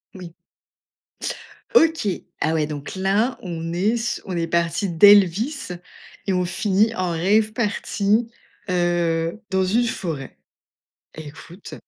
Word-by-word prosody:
Oui. 175 -3 -10 1.4
OK. 320 - +4 0.3
Ah 160 - +1
ouais, 155 -2 +1
donc 150 +3 -7
là, 200 +7 +1
on 165 -2 -5
est 190 +5 +1
s 235 0 -2
on 180 -2 -4
est 165 0 -1
parti 170 +3 0
d'Elvis 205 - +4 0.6
et 195 - 0
on 180 0 +1
finit 210 +4 +1
en 185 -1 -1
rave 210 +6 +2
party, 220 0 0 0.4
heu, 175 +1 0
dans 190 -1 +1
une 235 +6 +2
forêt. 160 - -5 0.8
Écoute. 160 +4 -11
185 Hz, 120 wpm, -22 LUFS, 170-215 Hz, 1.4 s, OK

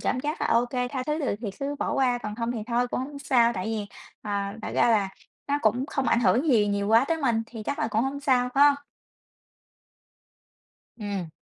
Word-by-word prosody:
cảm 250 - 0
giác 300 +4 -3
là - - +1
OK, 240 +1 +2 0.2
tha 260 -2 -3
thứ 300 +1 0
được 285 -9 -1
thì 220 -4 -3
cứ 280 +1 -2
bỏ - - -1
qua, 255 -3 +2
còn 210 -3 -5
không 230 +1 -2
thì 240 - -4
thôi 245 +1 0
cũng - - -2
hổng 280 +2 -6
sao. 240 -4 +3
Tại 185 -4 -4
vì, 220 -2 -2 0.4
ờ, 210 - -6 0.3
thật - - -5
ra - - +4
là 205 -4 +2 0.4
nó 285 - +1
cũng 245 +5 +2
không 275 -2 -1
ảnh 235 - +3
hưởng 255 +6 +3
gì 220 -6 +4
nhiều 200 0 -1
quá 225 +3 +5
tới 330 - +2
mình 230 -4 +2
thì 225 -2 -8
chắc 285 - -3
là 225 - 0
cũng 220 +1 +1
hông 270 +2 -3
sao, 255 -3 +2
phải 280 +1 +6
hông? 290 -1 +6 2.2
Ừm. 200 -5 -4
245 Hz, 225 wpm, -26 LUFS, 220-275 Hz, 2.2 s, phải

